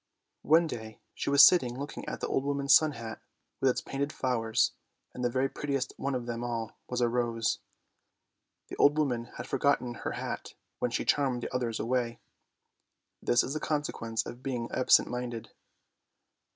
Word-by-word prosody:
One 160 +3 +5
day 110 -7 -7
she - - -3
was 140 0 +9
sitting 130 -9 +4
looking 140 +2 -6
at - - -6
the - - -1
old 135 - 0
woman's 140 -1 +2
sun 155 0 +6
hat 115 -3 -7 0.4
with 135 - +3
its 125 - 0
painted 140 +2 -2
flowers, 115 -5 +1 0.4
and 125 - -5
the 120 - +2
very 130 +2 +1
prettiest 140 -1 -3
one 140 0 -2
of 125 -1 -3
them 120 0 -4
all 115 -2 -3
was 125 0 -1
a 120 - +4
rose. 115 -2 0 1.1
The - - -6
old 145 +1 +5
woman 125 -6 0
had - - -5
forgotten 135 -2 +1
her - - -3
hat - - -5 0.2
when 125 - 0
she 120 - -2
charmed 130 -4 +1
the - - -5
others 120 -3 -1
away. 120 0 -1 1.0
This 120 - +3
is 135 - -3
the 155 - -2
consequence 145 -8 -2
of 120 - -8
being 125 -3 -3
absent 130 - +5
minded. 120 -2 -5
125 Hz, 175 wpm, -30 LUFS, 120-140 Hz, 1.1 s, was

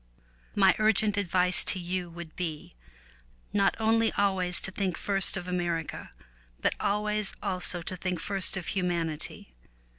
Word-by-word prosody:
My 195 -2 +6
urgent 215 -1 +3
advice 180 -2 +2
to - - +3
you 180 0 -3
would 170 -1 -10
be 160 - -5 0.8
not 200 -1 +3
only 225 +1 +3
always 190 -3 +1
to 190 - -1
think 190 -3 -2
first 195 -1 +2
of 180 -2 -6
America, 175 -3 -2 0.5
but - - +1
always 210 0 -1
also 180 -3 0
to 185 - -4
think 180 -1 -3
first 195 +2 +1
of 180 - -5
humanity. 170 - -2
185 Hz, 140 wpm, -28 LUFS, 175-200 Hz, 0.8 s, My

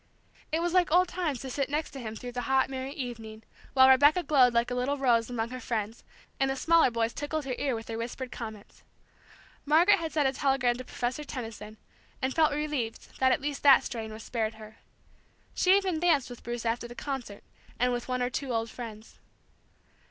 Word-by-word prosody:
It 320 +2 0
was 345 0 -1
like 365 -1 +4
old 360 +2 +5
times 315 -9 -2
to 265 - -6
sit 275 +1 -1
next 300 +2 -2
to 275 - -8
him 220 -3 -6
through 245 +2 -7
the 245 0 -4
hot 265 0 +2
merry 265 0 -4
evening, 225 -5 -7 0.3
while 260 -1 +7
Rebecca 290 +6 +5
glowed 260 -6 +5
like 235 +1 +1
a - - 0
little 255 +3 -1
rose 240 -4 +2
among 230 -2 -2
her 255 - -5
friends, 225 -2 -4 0.4
and 270 0 +2
the 270 - -1
smaller 330 +2 +4
boys 230 -1 -1
tickled 295 0 -3
her 265 - -2
ear 270 -4 0
with 225 0 -6
their 225 0 -5
whispered 245 +2 -5
comments. 220 -3 -9 0.8
Margaret 335 +7 +5
had 325 -1 -4
sent 295 -3 +2
a 265 - 0
telegram 270 -3 +1
to 255 - -6
Professor 250 +3 -3
Tenison, 225 -5 -7 0.4
and 260 0 -1
felt 315 -2 +3
relieved 290 -6 -4
that 260 0 +4
at 255 - +1
least 285 0 -3
that 280 -2 +7
strain 225 -2 -5
was 215 0 -9
spared 225 -2 -2
her. 215 0 -13 0.8
She 375 +2 +4
even 375 -5 -1
danced 310 -7 +2
with 245 - -10
Bruce 240 0 -5
after 235 +1 -1
the 240 - -11
concert, 250 -8 -5 0.4
and 250 +1 +2
with 240 0 -4
one 255 -1 -1
or 245 - -1
two 270 0 -3
old 225 -1 -1
friends. 220 -3 -9
255 Hz, 210 wpm, -28 LUFS, 230-290 Hz, 0.8 s, while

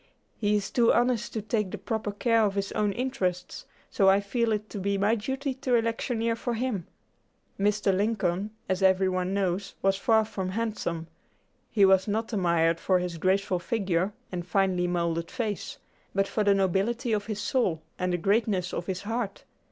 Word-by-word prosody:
He 210 0 +1
is 200 -1 -1
too 235 -2 +4
honest 240 -1 +1
to 220 - -3
take 210 -2 -1
the 210 - -5
proper 210 +1 -3
care 230 +2 +2
of 200 -2 +1
his 200 0 -2
own 210 -1 +1
interests, 235 -7 -3 0.2
so 195 -1 +4
I 195 +1 +5
feel 230 +3 0
it 215 0 -1
to 205 - -5
be 200 +1 0
my 205 +3 +2
duty 265 +5 -2
to 255 -1 0
electioneer 230 0 0
for 235 +1 -3
him." 225 -7 -2 0.7
Mr. 205 -1 +2
Lincoln, 200 -2 0 0.2
as 185 0 -1
every 190 0 +4
one 185 +1 -1
knows, 195 0 -1
was 195 0 +3
far 220 +1 +3
from 190 -4 -4
handsome. 200 -6 -2 0.6
He 205 -3 +4
was 190 0 +4
not 225 +3 -2
admired 170 -4 +2
for 185 - +2
his 180 -2 -3
graceful 190 0 +1
figure 190 -2 0 0.2
and 180 -1 -3
finely 180 0 +1
moulded 170 -1 -1
face, 220 -6 -3 0.4
but 195 0 +2
for 215 - 0
the 200 -1 +4
nobility 200 +6 +1
of 210 -1 -1
his 215 -2 -3
soul 205 -8 0 0.2
and 180 0 0
the 175 - +1
greatness 195 0 +1
of 175 - -4
his 190 0 -3
heart. 225 -1 -3
200 Hz, 185 wpm, -27 LUFS, 185-225 Hz, 0.7 s, I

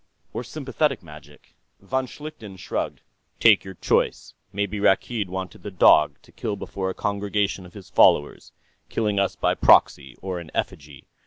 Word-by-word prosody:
"Or - - -4
sympathetic 135 -1 -2
magic?" 75 -2 -15 0.3
Von 130 +6 -2
Schlichten 125 -10 -10
shrugged. - - -4 0.4
"Take - - +6
your 95 -1 -9
choice. - - 0 0.2
Maybe 100 +1 -2
Rakkeed 105 +1 +1
wanted 95 0 -6
the 105 - -6
dog, 75 -5 +5
to - - -20
kill 110 -3 -4
before 95 -1 -4
a 95 - -5
congregation 100 -2 -2
of 90 - -19
his 100 -3 -12
followers, 75 - +3 0.4
killing 105 -3 0
us 100 -1 0
by - - +1
proxy, 70 -3 +4
or 95 -2 -4
in 85 -2 -10
effigy. 70 -2 -5
100 Hz, 155 wpm, -24 LUFS, 90-105 Hz, 0.4 s, Take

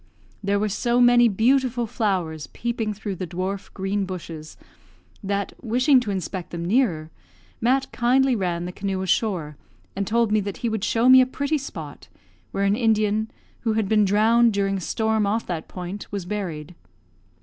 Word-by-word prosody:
There 200 0 +1
were 210 +1 0
so 235 +4 0
many 240 -1 +6
beautiful 245 +3 +2
flowers 185 - -2
peeping 230 -2 -3
through 200 -2 -5
the 185 - -4
dwarf, 185 +3 -4
green 195 +1 -1
bushes, 165 -4 -8 0.7
that, 200 0 -2
wishing 255 +3 +3
to 240 -4 -4
inspect 185 -2 -4
them 170 -1 -5
nearer, 175 -8 +1 0.5
Mat 260 +3 +2
kindly 255 +2 +2
ran 175 -4 -2
the 180 - -4
canoe 190 0 -3
ashore, 180 -6 -1 0.4
and 195 0 -2
told 230 -1 +2
me 215 - +3
that 200 -1 -4
he - - +2
would 220 -2 -3
show 230 +2 +2
me 260 0 +9
a 255 - +2
pretty 285 +3 -1
spot, 160 - -8 0.4
where 195 - -2
an 200 +1 +3
Indian, 220 -2 +1 0.3
who 225 -2 0
had 215 -2 0
been 210 +1 +3
drowned 220 +3 +4
during 195 -1 0
a - - -5
storm 220 +3 0
off 220 +3 0
that 170 -3 -4
point, 180 +2 -7
was 200 -3 -4
buried. 180 -6 -5
205 Hz, 170 wpm, -23 LUFS, 185-235 Hz, 0.7 s, me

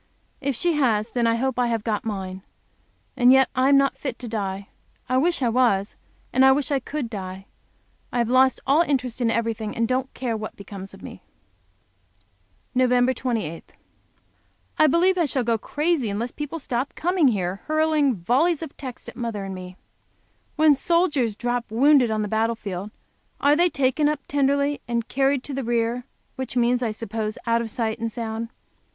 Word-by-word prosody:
If 280 -2 -2
she 345 +7 +1
has, 230 -7 +1
then 240 -2 +1
I 230 - +3
hope 260 +1 -1
I 245 - +3
have 230 -2 -1
got 215 -3 -1
mine. 190 -3 -5 0.7
And 245 0 +5
yet 265 0 +5
I 260 +1 +2
am 280 - +6
not 275 0 +2
fit 265 -5 -4
to 245 - -7
die. 200 -3 -3 0.4
I 255 - +1
wish 335 +1 +2
I 240 - +3
was, 225 -4 +2 0.4
and 260 - +4
I 265 - +8
wish 285 0 -1
I 275 - +2
could 280 0 -4
die. 190 -3 -7 0.7
I - - -2
have 235 -1 +2
lost 260 +2 +4
all 280 +5 +4
interest 255 -6 -1
in 235 - +2
everything, 225 -2 -2
and 230 0 +1
don't 260 +2 -1
care 245 -3 -2
what 215 0 -6
becomes 195 -1 -9
of - - -16
me. - - -9 1.5
Nov. 255 -1 +3 0.2
23. 220 -12 -3 1.2
I 310 - +7
believe 360 +3 +3
I 340 - +3
shall 265 -3 0
go 230 -1 +1
crazy 295 -2 0
unless 225 +5 -3
people 295 +2 -5
stop 260 -2 -3
coming 350 -3 +2
here, 190 -5 0
hurling 310 -4 +2
volleys 280 - +1
of 320 - -8
texts 255 -4 -8
at - - -9
mother 230 -4 -4
and 195 0 -5
at 185 - -7
me. 180 0 -10 0.8
When 310 -1 +5
soldiers 290 - +1
drop 240 +1 -2
wounded 260 +2 +4
on 215 -1 0
the - - -2
battle 225 +2 0
field, 200 -2 -6 0.5
they 295 +5 +4
are - - -2
taken 280 +1 +1
up 300 -2 -2
tenderly 280 +1 +1
and 235 -1 -1
carried 270 0 +1
"to 285 - -5
the 270 0 -3
rear," 235 +1 -1 0.3
which 255 -2 -4
means, 245 +1 +2
I 235 - 0
suppose, 215 0 -4
out 230 0 +2
of 230 - -4
sight 220 -1 -2
and 230 0 -2
sound. 225 0 -4
245 Hz, 190 wpm, -24 LUFS, 220-275 Hz, 1.5 s, I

